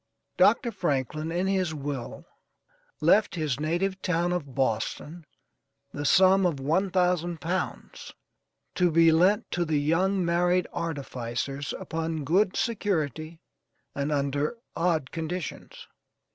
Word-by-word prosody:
Dr. 240 -4 +4
Franklin, 155 - -2
in 175 +2 0
his 185 -4 0
will, 140 -4 -5 0.8
left 190 +7 +4
his 150 -5 -2
native 180 +5 -1
town 175 0 0
of 145 -7 -4
Boston, 135 +6 -2 0.7
the 145 - -4
sum 190 +4 +5
of 170 -6 0
one 165 +8 +1
thousand 180 -2 +1
pounds, 180 +4 -4 0.6
to 180 -1 +2
be 165 0 +5
lent 190 +7 +3
to 175 - 0
the 155 -3 0
young 180 +5 +1
married 175 +1 +2
artificers 140 -4 -4
upon 165 -4 -3
good 185 +7 +2
security 160 - -2 0.5
and 140 +2 -2
under 145 - -1 0.2
odd 165 -5 0
conditions. 165 0 -6
165 Hz, 115 wpm, -27 LUFS, 145-180 Hz, 0.8 s, sum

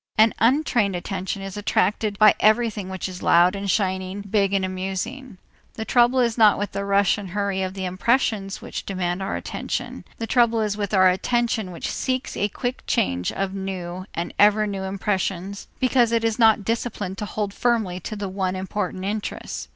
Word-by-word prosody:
An 220 +1 +5
untrained 235 -5 +2
attention 190 +2 -4
is 195 -1 -6
attracted 205 +1 0
by 215 0 +7
everything 215 -3 +2
which 190 0 -4
is 185 -1 -8
loud 175 +3 +4
and 200 0 -4
shining, 190 0 -1
big 200 -1 +1
and 195 -1 +1
amusing. 195 +6 -4 0.4
The 220 - -4
trouble 245 +2 +4
is 235 -1 0
not 215 -2 +6
with 205 -1 -3
the 200 - -3
rush 200 0 +2
and 195 -2 -7
hurry 200 0 -1
of 190 0 -3
the 190 -1 -3
impressions 195 +1 0
which - - -5
demand 185 -1 -2
our 190 - -2
attention; - - -4
the 225 - -3
trouble 230 0 +3
is 210 -1 0
with 205 -2 -3
our 185 -1 +6
attention 225 +2 0
which 170 - -4
seeks 255 -1 -2
a 205 - 0
quick 245 +5 -4
change 90 0 0
of 195 -1 -3
new 185 -1 -5
and 170 +1 -3
ever 210 +1 +5
new 200 -2 -4
impressions 195 0 -2
because 250 -2 +3
it 230 -1 +1
is 225 +1 0
not 220 -3 +5
disciplined 215 -4 -3
to 210 - -3
hold 205 -1 -3
firmly 220 -7 0
to 205 +2 -5
one 190 -1 -2
important 185 0 -3
interest. 210 +1 -4
200 Hz, 180 wpm, -23 LUFS, 190-220 Hz, 0.4 s, by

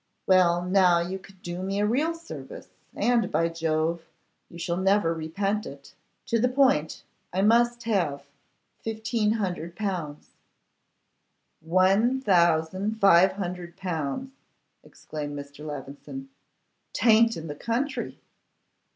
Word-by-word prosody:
'Well, 175 -2 +4
now 180 -1 +4
you 180 +3 -3
can 195 0 -17
do 175 +1 -5
me 195 +1 -2
a 205 - +2
real 295 +10 +1
service, 335 +9 -10 0.3
and, 235 -5 +1
by 165 0 +1
Jove, 165 0 -1 0.5
you 170 - -11
shall 170 0 -2
never 190 -2 +2
repent 195 +6 -2
it. 140 0 -12 0.3
To 230 - +1
the 250 +3 +2
point; 255 - +2 0.3
I 190 +2 0
must 240 +2 +3
have 170 -11 0 0.6
1,500L.' 205 -7 -2 1.4
'One 195 +9 +3
thousand 185 0 +2
five 190 -1 +6
hundred 180 -2 -6
pounds!' 175 - -3 0.5
exclaimed 145 -1 -7
Mr. 145 +1 -9
Levison. 150 - -8 0.7
''Tayn't 230 0 +4
in 160 - -7
the 150 - -5
country. 240 - -3
185 Hz, 115 wpm, -26 LUFS, 165-220 Hz, 1.4 s, five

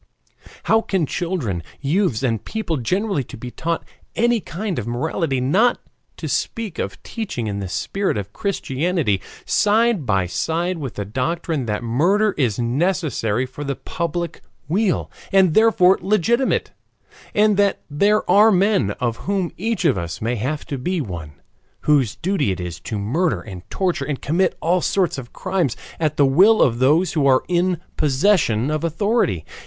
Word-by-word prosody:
How 220 0 +3
can 190 -7 0
children, 145 - -2 0.2
youths, 145 - 0
and 115 -4 0
people 215 -8 -3
generally 190 - 0
be 125 +1 -9
taught 165 +4 -3 0.3
any 235 0 +3
kind 190 - -4
of 115 - -5
morality 135 +3 -1
not 190 - +3 0.4
to - - -5
speak 220 -7 -2
of - - -4
teaching 210 - -4
in 100 -2 -3
the 100 - -4
spirit 195 - -1
of 100 0 -5
Christianity 165 - -1 0.2
side 215 - +2
by 95 -3 +2
side 165 - -1
with 135 -5 -5
the 100 - -3
doctrine 130 - -2
that 105 +2 -2
murder 180 - +2
is 120 -8 0
necessary 130 - 0
for 130 +3 -8
the 140 -1 -2
public 170 +2 -4 0.3
weal, 190 +4 0 0.2
and 190 -4 +4
therefore 205 -4 +5
legitimate, 215 +7 +1 0.6
and 210 0 +4
that 200 -1 +2
there 200 +9 +2
are 210 +2 +6
men, 195 - +3
of 120 -2 -1
whom 195 -3 0
each 215 -1 -2
of 135 - +3
us 85 -1 -5
may 115 +3 -1
have 135 +7 -3
to 140 - -4
be 180 +7 -1
one, 85 - -6 0.5
whose 140 -7 +2
duty 175 - 0
is 90 -2 -6
to 105 +5 -5
murder 145 - 0
and 95 -4 -10
torture 185 -3 -1
and 145 -3 -3
commit 175 +6 0
all 175 +2 +2
sorts 185 -7 0
of 120 -3 -10
crimes 185 -9 -1 0.2
at 155 -2 0
the 145 - +5
will 190 +12 +5
of 120 -2 +1
those 155 +7 +3
who 150 -4 +2
are 130 -1 +4
in 180 0 +1 0.2
possession 145 - +2
of 155 0 -1
authority. 170 - 0
160 Hz, 160 wpm, -21 LUFS, 125-195 Hz, 0.6 s, are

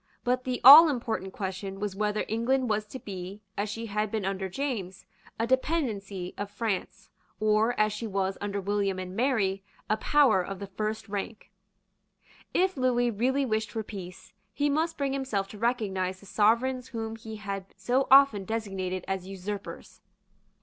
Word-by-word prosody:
But 250 +1 0
the 255 -1 -2
all 305 +6 +12
important 225 -7 -3
question 195 0 -5
was 205 -2 -3
whether 210 +1 -1
England 240 +2 +1
was 210 0 -1
to 260 - -7
be, 195 -2 -8
as 205 +1 -2
she 225 +2 -5
had 210 0 -1
been 215 -2 -2
under 190 0 -2
James, 195 -6 -4 0.3
a 230 - 0
dependency 225 - -1
of 205 0 -3
France, 210 -2 -4 0.3
or, 215 +2 +2
as 215 0 +3
she 225 +2 -4
was 195 -1 -1
under 200 0 -2
William 200 -1 -1
and 185 0 -6
Mary, 210 -6 +1 0.3
a 215 - +3
power 260 -4 +4
of 195 +2 -5
the 200 - -6
first 215 +3 -4
rank. 205 +1 -5 1.0
If 375 +1 +2
Lewis 245 -2 +2
really 265 +5 +1
wished 220 -2 -1
for 220 +1 -4
peace, 185 -4 -9 0.2
he 290 +6 0
must 320 +3 0
bring 275 -1 -1
himself 260 -8 -2
to 210 - -10
recognise 195 -6 -1
the 200 - -16
Sovereigns 235 +6 +2
whom 225 -2 -5
he 220 0 -8
had 200 -2 -5
so 245 +8 +1
often 270 -7 +7
designated 190 -4 -3
as 190 -1 -3
usurpers. 195 +1 -7
215 Hz, 165 wpm, -28 LUFS, 195-245 Hz, 1.0 s, all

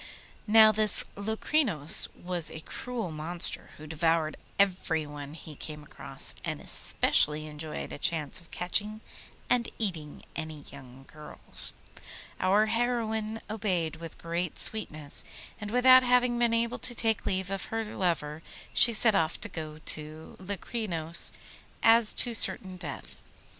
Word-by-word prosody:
Now 220 0 +7
this 215 -1 +3
Locrinos 220 - +2
was 175 -2 -4
a 160 - -9
cruel 230 0 -6
monster 160 +3 +4
who 155 - -11
devoured 160 0 0 0.2
everyone 155 -7 -1
he 160 -1 -11
came 150 +1 -6
across, - - -2
and - - -4
especially 150 +1 +2
enjoyed 155 0 -7
a - - -8
chance 155 -1 -1
of 165 - -20
catching 210 +4 -2 0.5
and 245 -2 +1
eating 165 -9 -3
any 155 -2 -6
young 135 -2 -13
girls. 150 -1 +1 0.6
Our 200 +3 +3
heroine 225 -1 -2
obeyed 185 -7 -2
with 165 -1 -10
great 170 0 -4
sweetness, 155 -9 -1 0.4
and 210 -2 -6
without 255 +2 +6
having 250 -1 +2
been 240 -1 +2
able 235 +1 -1
to 245 - -1
take 225 -2 -1
leave 190 -1 -2
of 195 -1 -4
her 225 0 -3
lover 165 -7 -3 0.3
she 235 - +6
set 220 0 +4
off 165 -4 0
to 225 - 0
go 155 -4 -7
to 155 +1 -3
Locrinos 185 -4 -2 0.5
as 225 -1 +5
to 240 - +2
certain 190 -3 -1
death. 170 -6 -8
185 Hz, 135 wpm, -28 LUFS, 155-220 Hz, 0.6 s, Now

